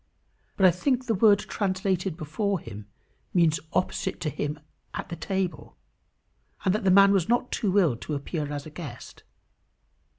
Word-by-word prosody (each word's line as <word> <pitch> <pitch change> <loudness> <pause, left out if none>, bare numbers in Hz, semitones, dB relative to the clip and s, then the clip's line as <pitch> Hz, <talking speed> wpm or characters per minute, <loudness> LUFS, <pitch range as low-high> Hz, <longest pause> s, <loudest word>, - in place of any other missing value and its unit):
But 195 - +4
I 185 - +8
think 255 - 0
the 225 - +1
word 205 0 +5
translated 190 -3 -1
before 185 +5 -1
him 105 -6 -10 0.5
means 165 -3 +4
opposite 185 - -1
to 155 - -1
him 145 +3 -3 0.4
at - - -5
the 170 - -4
table; 185 +2 -3 0.9
and 185 - +3
that 215 - -1
the 195 - +3
man 200 +1 +7
was 190 -2 +1
not 245 +1 +1
too 205 -2 0
ill 170 -11 +4
to 150 - -4
appear 145 +1 -4
as 145 -1 -4
a 155 - -9
guest. 145 -7 -9
180 Hz, 165 wpm, -26 LUFS, 155-200 Hz, 0.9 s, I